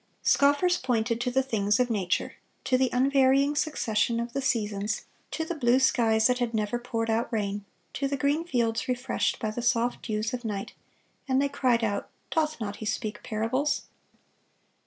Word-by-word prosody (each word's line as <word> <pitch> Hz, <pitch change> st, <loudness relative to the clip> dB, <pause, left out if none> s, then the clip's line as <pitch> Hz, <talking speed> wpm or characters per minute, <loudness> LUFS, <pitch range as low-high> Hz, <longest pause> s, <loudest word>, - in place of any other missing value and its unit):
Scoffers 290 Hz, +6 st, +3 dB
pointed 235 Hz, -2 st, 0 dB
to 250 Hz, -, 0 dB
the 265 Hz, +2 st, +2 dB
things 210 Hz, -4 st, +1 dB
of 250 Hz, -1 st, +2 dB
nature,—to 190 Hz, +5 st, -2 dB
the 260 Hz, 0 st, +3 dB
unvarying 270 Hz, +2 st, +3 dB
succession 235 Hz, -6 st, 0 dB
of 235 Hz, 0 st, -4 dB
the 275 Hz, -, -1 dB
seasons, 210 Hz, -5 st, -1 dB, 0.2 s
to 320 Hz, -, -3 dB
the 345 Hz, -, -3 dB
blue 250 Hz, -5 st, +3 dB
skies 225 Hz, -4 st, +3 dB
that 250 Hz, +1 st, +3 dB
had 235 Hz, -2 st, -1 dB
never 215 Hz, +2 st, -1 dB
poured 230 Hz, -2 st, -2 dB
out 230 Hz, +3 st, 0 dB
rain, 205 Hz, -2 st, -2 dB, 0.3 s
to 275 Hz, -, -1 dB
the 280 Hz, 0 st, -2 dB
green 285 Hz, +4 st, +1 dB
fields 235 Hz, -8 st, 0 dB
refreshed 250 Hz, 0 st, -1 dB
by 215 Hz, -2 st, -2 dB
the 240 Hz, -, -4 dB
soft 240 Hz, 0 st, +1 dB
dews 215 Hz, 0 st, -2 dB
of 250 Hz, 0 st, -4 dB
night,—and 225 Hz, +5 st, -5 dB
they 280 Hz, -, +2 dB
cried 250 Hz, -4 st, +1 dB
out, 205 Hz, -2 st, -1 dB, 0.2 s
"Doth 310 Hz, -1 st, 0 dB
he 225 Hz, -, -4 dB
not 200 Hz, 0 st, -5 dB
speak 210 Hz, -2 st, -3 dB
parables?" 255 Hz, +7 st, -1 dB
240 Hz, 170 wpm, -27 LUFS, 220-265 Hz, 0.3 s, Scoffers